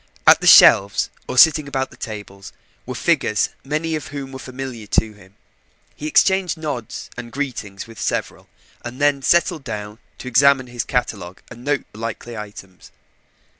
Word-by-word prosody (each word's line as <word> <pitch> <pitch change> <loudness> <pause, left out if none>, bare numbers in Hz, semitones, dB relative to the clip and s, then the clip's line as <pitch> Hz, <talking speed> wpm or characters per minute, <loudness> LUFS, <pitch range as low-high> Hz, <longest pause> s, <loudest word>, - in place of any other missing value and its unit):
At - - +7
the - - 0
shelves, 100 0 +7 0.2
or - - -5
sitting 155 +2 +6
about 135 -1 -1
at - - -10
the - - -16
tables, 105 -4 -8 0.4
were - - -5
figures, - - +1
many 155 +3 -2
of 155 - -5
whom 140 -2 -7
were 130 - -8
familiar 130 -4 -8
to 110 +1 0
him. 100 -1 -19 0.6
He 150 - -6
exchanged 190 +1 +2
nods 145 -8 -6
and 120 -1 -8
greetings 120 -8 -5
with 115 -1 -12
several, - - -3 0.3
and 120 +2 -8
then 145 -1 +2
settled 165 -1 +2
down 105 -2 -7 0.2
to - - -9
examine 135 +2 +4
his 120 -2 -4
catalogue 100 -8 -3
and 120 +1 -11
note 145 0 -1
likely 115 +2 -6
items. 100 -3 -11
125 Hz, 165 wpm, -20 LUFS, 105-140 Hz, 0.6 s, At